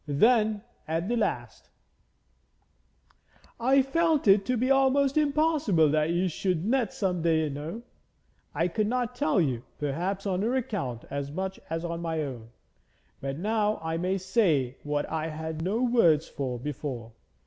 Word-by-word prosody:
Then 215 Hz, -, +3 dB, 0.2 s
at 165 Hz, +3 st, -1 dB
the 240 Hz, -, 0 dB
last: 230 Hz, -, -3 dB, 1.9 s
'I 265 Hz, +3 st, +4 dB
felt 315 Hz, 0 st, +1 dB
it 195 Hz, 0 st, +6 dB
to 255 Hz, -1 st, +1 dB
be 255 Hz, +4 st, +1 dB
almost 270 Hz, 0 st, +3 dB
impossible 290 Hz, -, +3 dB
that 155 Hz, +1 st, +1 dB
you 175 Hz, +2 st, +1 dB
should 180 Hz, 0 st, -1 dB
net 240 Hz, -2 st, +1 dB
some 180 Hz, -4 st, -1 dB
day 160 Hz, -1 st, +2 dB
know. 155 Hz, +11 st, -6 dB, 0.7 s
I 165 Hz, -, +2 dB
could 210 Hz, +4 st, -1 dB
not 245 Hz, +1 st, -1 dB
tell 265 Hz, -6 st, +1 dB
you, 130 Hz, -8 st, 0 dB, 0.2 s
perhaps 175 Hz, +8 st, -2 dB
on 190 Hz, -2 st, 0 dB
her 235 Hz, +5 st, 0 dB
account 195 Hz, -, -3 dB
as 140 Hz, 0 st, -3 dB
much 190 Hz, +4 st, -4 dB
as 165 Hz, +1 st, -3 dB
on 170 Hz, 0 st, -4 dB
my 160 Hz, -2 st, -2 dB
own. 120 Hz, -5 st, -7 dB, 0.7 s
But 135 Hz, 0 st, -4 dB
now 210 Hz, +3 st, 0 dB
I 160 Hz, 0 st, -2 dB
may 185 Hz, +3 st, 0 dB
say 175 Hz, -, +1 dB
what 145 Hz, 0 st, -2 dB
I 160 Hz, 0 st, -2 dB
had 160 Hz, 0 st, -5 dB
no 205 Hz, +8 st, 0 dB
words 170 Hz, -, +4 dB
for 130 Hz, -3 st, -4 dB
before. 130 Hz, -3 st, -5 dB
180 Hz, 155 wpm, -28 LUFS, 155-230 Hz, 1.9 s, it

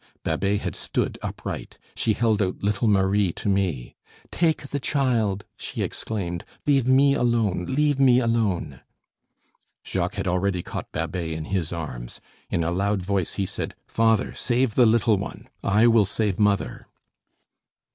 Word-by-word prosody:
Babet 100 Hz, +5 st, 0 dB
had -, -, -4 dB
stood -, -, -2 dB
upright. -, -, -6 dB, 0.2 s
She 110 Hz, -, +1 dB
held 110 Hz, -1 st, +1 dB
out 95 Hz, 0 st, -2 dB
little 105 Hz, +3 st, +1 dB
Marie 100 Hz, -1 st, +3 dB
to -, -, -6 dB
me: 95 Hz, -11 st, 0 dB, 0.4 s
"Take 160 Hz, -4 st, 0 dB
the 145 Hz, -, -2 dB
child," 115 Hz, -8 st, 0 dB
she -, -, -4 dB
exclaimed. 90 Hz, -6 st, -4 dB, 0.2 s
"Leave 135 Hz, -4 st, +3 dB
me 135 Hz, +2 st, +5 dB
alone, 115 Hz, -8 st, +1 dB
leave 145 Hz, +1 st, +2 dB
me 130 Hz, -3 st, +6 dB
alone!" 110 Hz, -, 0 dB, 1.0 s
Jacques -, -, -2 dB
had -, -, -3 dB
already 90 Hz, 0 st, 0 dB
caught -, -, -6 dB
Babet 85 Hz, +1 st, -3 dB
in 80 Hz, -1 st, -4 dB
his 85 Hz, -5 st, -1 dB
arms. 65 Hz, -8 st, -6 dB, 0.3 s
In 85 Hz, -, 0 dB
a 85 Hz, -, 0 dB
loud 100 Hz, +2 st, 0 dB
voice 95 Hz, -2 st, -1 dB
he 100 Hz, -, -1 dB
said: -, -, -5 dB
"Father, 115 Hz, -1 st, +2 dB
save 125 Hz, -1 st, +1 dB
the 125 Hz, 0 st, +5 dB
little 115 Hz, -1 st, +3 dB
one -, -, -7 dB, 0.2 s
I 105 Hz, +3 st, +4 dB
will 115 Hz, -3 st, +5 dB
save 105 Hz, 0 st, -1 dB
mother." 105 Hz, -1 st, +1 dB
105 Hz, 150 wpm, -24 LUFS, 90-120 Hz, 1.0 s, me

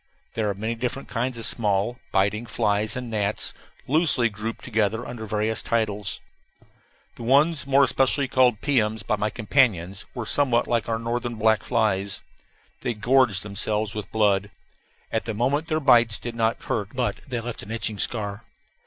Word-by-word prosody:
There 110 Hz, -2 st, -1 dB
are 100 Hz, -, -2 dB
many 110 Hz, +4 st, -2 dB
different 125 Hz, +3 st, -4 dB
kinds 125 Hz, +1 st, -2 dB
of 115 Hz, -, -1 dB
small, 105 Hz, +2 st, 0 dB
biting 100 Hz, +4 st, +1 dB
flies 110 Hz, -1 st, 0 dB
and 125 Hz, -2 st, -5 dB
gnats, 105 Hz, -1 st, 0 dB, 0.3 s
loosely 145 Hz, -5 st, +3 dB
grouped 110 Hz, +2 st, -6 dB
together 110 Hz, 0 st, 0 dB
under 110 Hz, -3 st, -7 dB
various 110 Hz, +1 st, -1 dB
titles. 105 Hz, -3 st, -1 dB, 1.0 s
The -, -, -10 dB
ones 140 Hz, +5 st, +3 dB
more 140 Hz, 0 st, +5 dB
especially 135 Hz, +1 st, +2 dB
called 125 Hz, -4 st, +3 dB
piums 110 Hz, -6 st, +1 dB
by -, -, +1 dB
my 105 Hz, +1 st, 0 dB
companions 105 Hz, -6 st, +1 dB
were 120 Hz, -3 st, -4 dB
somewhat 130 Hz, -1 st, +2 dB
like 115 Hz, -1 st, 0 dB
our 115 Hz, -, 0 dB
northern 120 Hz, +1 st, -3 dB
black 110 Hz, 0 st, +3 dB
flies. 100 Hz, -4 st, 0 dB, 0.6 s
They 120 Hz, -, -2 dB
gorged 120 Hz, -3 st, +3 dB
themselves 105 Hz, +1 st, -1 dB
with 105 Hz, -1 st, -6 dB
blood. 105 Hz, -2 st, +2 dB, 0.6 s
At 110 Hz, -, -1 dB
the 110 Hz, -, -3 dB
moment 140 Hz, +8 st, 0 dB
their 155 Hz, -1 st, 0 dB
bites 120 Hz, -6 st, +5 dB
did 120 Hz, -, -6 dB
not 115 Hz, 0 st, 0 dB
hurt, 105 Hz, 0 st, -3 dB
but 125 Hz, -1 st, -1 dB
they 125 Hz, -3 st, -2 dB
left 120 Hz, 0 st, -5 dB
an 100 Hz, -, -11 dB
itching 110 Hz, -2 st, -2 dB
scar. 105 Hz, -1 st, -2 dB
115 Hz, 165 wpm, -24 LUFS, 105-125 Hz, 1.0 s, more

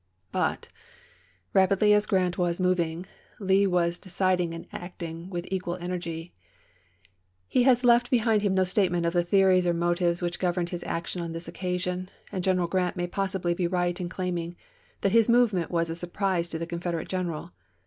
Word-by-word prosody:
But, -, -, -1 dB, 0.9 s
rapidly 195 Hz, +2 st, +4 dB
as 210 Hz, 0 st, +3 dB
Grant 180 Hz, -2 st, +1 dB
was 175 Hz, -1 st, 0 dB
moving, 180 Hz, -2 st, 0 dB, 0.3 s
Lee 195 Hz, 0 st, +3 dB
was 175 Hz, -1 st, +1 dB
decid 185 Hz, -1 st, 0 dB
ing 170 Hz, -1 st, -2 dB
and 165 Hz, -, -8 dB
acting 170 Hz, -1 st, -7 dB
with 175 Hz, -2 st, -4 dB
equal 180 Hz, -2 st, -2 dB
energy. 175 Hz, -2 st, -5 dB, 1.1 s
He 255 Hz, -, +2 dB
has 250 Hz, 0 st, +4 dB
left 240 Hz, 0 st, +5 dB
behind 225 Hz, -3 st, +3 dB
him 200 Hz, -2 st, +1 dB
no 190 Hz, -, +4 dB
statement 180 Hz, -2 st, +1 dB
of 170 Hz, -, 0 dB
the 175 Hz, -1 st, +3 dB
theories 185 Hz, 0 st, +4 dB
or 170 Hz, -, +2 dB
motives 175 Hz, 0 st, +1 dB
which 175 Hz, -1 st, -3 dB
governed 175 Hz, -1 st, 0 dB
his 175 Hz, -1 st, -4 dB
action 170 Hz, +1 st, -3 dB
on 165 Hz, -1 st, -4 dB
this 165 Hz, +1 st, -6 dB
occasion, 180 Hz, 0 st, -3 dB, 0.2 s
and 185 Hz, -, -3 dB
General 185 Hz, -1 st, +2 dB
Grant 180 Hz, 0 st, 0 dB
may 175 Hz, -1 st, -1 dB
possibly 190 Hz, -1 st, -1 dB
be 175 Hz, 0 st, 0 dB
right 175 Hz, 0 st, -1 dB
in 175 Hz, -, -3 dB
claiming 175 Hz, -2 st, -3 dB, 0.5 s
that 195 Hz, -, +2 dB
his 230 Hz, +1 st, +4 dB
movement 230 Hz, -8 st, +3 dB
was 170 Hz, -1 st, 0 dB
a 165 Hz, -, -4 dB
surprise 175 Hz, 0 st, -1 dB
to 165 Hz, -, -3 dB
the 165 Hz, -, -3 dB
Confede 170 Hz, 0 st, -3 dB
rate 160 Hz, -, -4 dB
general. 175 Hz, -2 st, -3 dB
180 Hz, 180 wpm, -27 LUFS, 170-190 Hz, 1.1 s, left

